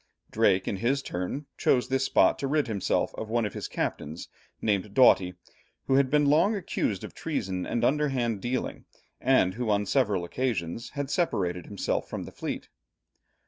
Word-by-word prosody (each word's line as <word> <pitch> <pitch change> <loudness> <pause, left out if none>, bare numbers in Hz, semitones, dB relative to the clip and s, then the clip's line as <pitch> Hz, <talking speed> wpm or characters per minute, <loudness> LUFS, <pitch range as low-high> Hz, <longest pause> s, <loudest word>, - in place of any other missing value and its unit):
Drake 100 -4 +3
in 100 - -1
his 130 +7 0
turn, 90 +12 -4
chose 125 -1 +3
this 135 +1 +1
spot - - +3
to 140 - -1
rid 150 +1 +2
himself 105 -4 0
of 110 - -6
one 115 0 +1
of 105 - -4
his - - -5
captains, 80 +3 -4 0.3
named 100 -1 -1
Doughty, 95 -8 +5 0.5
who - - +1
had 135 0 +4
been 150 +1 +3
long 160 +9 +4
accused 115 - -2
of - - -7
treason 95 - -3
and 120 - -1
underhand 130 -8 +1
dealing, 125 +3 -3 0.3
and 125 -8 +3
who 120 +1 -3
on 105 -1 +2
several 105 -6 +1
occasions 115 -1 -2
had 145 -1 -2
separated 90 - 0
himself 100 - -2
from - - -4
the - - -9
fleet. - - -5
115 Hz, 170 wpm, -28 LUFS, 95-135 Hz, 0.5 s, Doughty